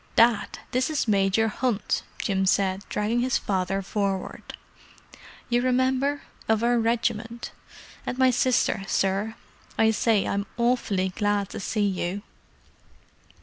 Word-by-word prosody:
"Dad, 230 -2 +3
this 255 +3 +1
is 300 -5 -1
Major 200 +1 +3
Hunt," 225 -1 -1 0.2
Jim 190 -2 0
said, 190 0 +2
dragging 215 +3 0
his 255 +1 +2
father 195 0 -1
forward. 195 -1 -3 0.9
"You 240 0 +2
remember, 260 +3 +1 0.3
of 220 0 +2
our 240 0 +3
regiment. 230 0 -1 0.5
And 250 - -4
my 260 -1 +5
sister, 250 -4 +2
sir. 195 +4 0 0.4
I 220 0 +4
say, 220 -1 +2
I'm 200 0 -1
awfully 235 -6 +1
glad 205 0 0
to - - -6
see 210 +1 0
you!" 190 0 -2
220 Hz, 125 wpm, -26 LUFS, 195-240 Hz, 0.9 s, my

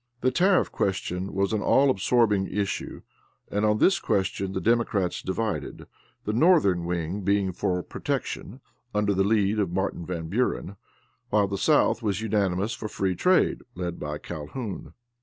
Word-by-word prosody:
The 130 - +2
tariff 180 +7 +3
question 95 -1 -2
was 100 +2 0
an 105 - 0
all 135 +6 +4
absorbing 105 -3 +2
issue, 100 -1 -3 0.5
and 105 +1 0
on 105 0 +3
this 190 - +4
question 95 0 -1
the 95 - -1
Democrats 110 -5 +1
divided 105 +3 -3 0.4
the 105 - -1
northern 115 - +4
wing 85 +3 -2
being 100 0 +1
for 90 -1 -1
protection, 125 +8 -4 0.3
under 105 -1 +2
the 95 0 +2
lead 105 0 +2
of 100 -4 +1
Martin 95 -1 -2
Van 85 -2 -4
Buren; 100 -1 -1 0.5
while 105 -1 +3
the 100 - -3
South 150 0 +3
was 100 -4 -1
unanimous 105 -1 0
for 110 0 -5
free 95 -3 -1
trade, 180 - +2
led 85 -1 -4
by 75 0 -4
Calhoun. 90 - -7
100 Hz, 155 wpm, -26 LUFS, 95-110 Hz, 0.5 s, all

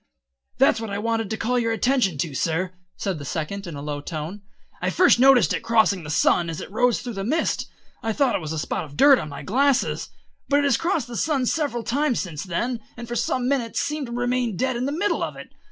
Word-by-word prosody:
"That's 255 -4 +4
what 225 - -4
I 200 - -3
wanted 225 0 -1
to 220 - -2
call 245 +3 0
your 230 -1 0
attention 225 - +1
to, 150 +1 -2
sir," 170 +7 -1 0.2
said 190 -6 -2
the - - -7
Second 175 +7 -4
in 165 - -6
a 140 - -7
low 145 -1 -4
tone. 160 +6 -6 0.4
"I - - +1
first 360 -9 +4
noticed 265 -1 +6
it - - 0
crossing 220 -4 +3
the 150 - -8
sun 170 +2 +2
as 160 - -4
it - - -8
rose 245 +3 +2
through 245 - -5
the 195 -1 -4
mist. 310 +10 0 0.3
I 225 - -1
thought 260 +2 +2
it - - -1
was 155 -1 -5
a 160 - -3
spot 155 - -2
of 145 -2 -11
dirt 280 -2 +7
on 155 - -5
my 140 - -8
glasses, 270 +5 +1 0.4
but 285 - +4
it 290 - +3
has 280 -4 +3
crossed 330 -7 0
the 240 - -7
sun 280 -1 +1
several 275 -4 -1
times 270 +1 +1
since 155 -6 -4
then, 235 +7 -2 0.2
and 235 0 -7
for 240 - -4
some 245 +2 0
minutes 255 -4 0
seemed 295 -2 -2
to - - -8
remain 245 -3 -1
dead 260 +3 0
in 240 +2 -1
the - - -1
middle 400 +7 0
of - - -3
it. - - -11
230 Hz, 245 wpm, -24 LUFS, 180-260 Hz, 0.4 s, dirt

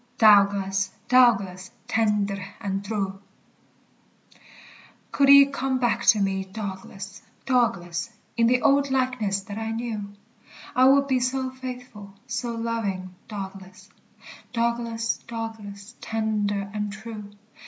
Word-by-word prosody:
"Dowglas, 200 -2 +4 0.2
Dowglas, 200 -7 +4 0.2
tendir 205 -3 +1 0.2
and 195 -2 -3
treu." 195 -2 -3 1.9
Could 275 -1 +3
ye 280 0 +10
come 270 -1 -1
back 235 -2 +1
to 215 - +7
me, 195 -1 0
Douglas, 195 0 -7 0.2
Douglas, 205 -7 0 0.3
In 230 -1 +3
the 250 +1 +2
old 280 0 +4
likeness 250 -7 0
that 205 +2 -7
I 225 0 -3
knew, 225 -3 -4 0.6
I 255 0 +5
would 275 +1 +6
be 260 -2 +2
so 260 +1 -1
faithful, 250 -6 -9
so 235 -1 -3
loving, 210 -6 -3
Douglas, 190 -2 -8 0.6
Douglas, 235 -1 -1
Douglas, 220 -3 -7
tender 205 -2 -1
and 210 -1 -2
true. 210 0 -8
220 Hz, 110 wpm, -25 LUFS, 200-240 Hz, 1.9 s, ye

